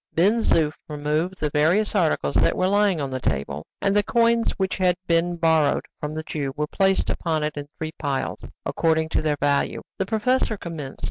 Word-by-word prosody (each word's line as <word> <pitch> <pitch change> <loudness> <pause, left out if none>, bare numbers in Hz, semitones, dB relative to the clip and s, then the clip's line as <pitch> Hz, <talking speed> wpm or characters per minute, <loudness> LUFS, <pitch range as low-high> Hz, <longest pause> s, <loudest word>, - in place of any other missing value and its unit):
Ben 200 +8 +4
Zoof 155 -7 +2 0.2
removed 150 +5 -2
the 150 -1 -1
various 170 +9 +2
articles 175 -7 +1
that - - +3
were 185 - +2
lying 200 -3 +2
on 140 -2 -3
the 130 - -2
table, 75 - -3 0.2
and 200 0 +2
the 205 - +5
coins 230 +1 +2
which 190 -1 -2
had 180 -2 +3
just 185 +1 -53
been 170 +1 +2
borrowed 160 -3 +2
from 150 +1 -4
the 155 - -3
Jew 145 -3 -3
were 150 - 0
placed 195 +4 +1
upon 160 -3 -1
it 150 0 -2
in 145 -1 -6
three 160 0 -4
piles, 140 -3 -2 0.2
according 160 -1 +1
to - - +1
their 150 -1 0
value. 140 0 +1 0.2
The 190 - 0
professor 225 +1 +1
commenced. 160 -7 -7
160 Hz, 200 wpm, -24 LUFS, 150-190 Hz, 0.2 s, the